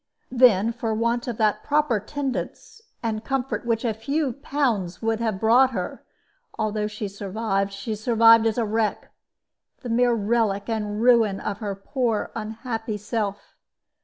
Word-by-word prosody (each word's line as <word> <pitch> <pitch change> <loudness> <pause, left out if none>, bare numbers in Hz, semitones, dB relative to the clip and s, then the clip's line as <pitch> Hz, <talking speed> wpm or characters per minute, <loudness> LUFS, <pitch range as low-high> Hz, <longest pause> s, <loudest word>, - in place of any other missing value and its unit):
Then, 235 -4 +4
for 225 -2 -2
want 235 +3 0
of 235 -3 -3
that 215 -2 +1
proper 295 -6 +1
tendance 280 - -5 0.2
and 220 -1 -2
comfort 265 -2 -2
which 230 0 0
a 225 - +1
few 275 +5 -1
pounds 245 -10 -1
would 225 0 0
have 220 -4 -1
brought 240 +5 +5
her, 180 -4 -4 0.5
although 215 -1 -1
she 210 0 -5
survived, 200 0 -2
she 200 +3 -5
survived 225 +1 +5
as 220 - -1
a 235 - +1
wreck, 220 0 -1 0.7
the 245 - -5
mere 240 +1 +3
relic 210 -2 0
and 215 -1 -2
ruin 230 -5 +4
of 205 -1 -4
her 205 -3 -3
poor 225 +2 -2
unhappy 225 0 -4
self. 210 -1 -4
225 Hz, 150 wpm, -24 LUFS, 210-240 Hz, 0.7 s, brought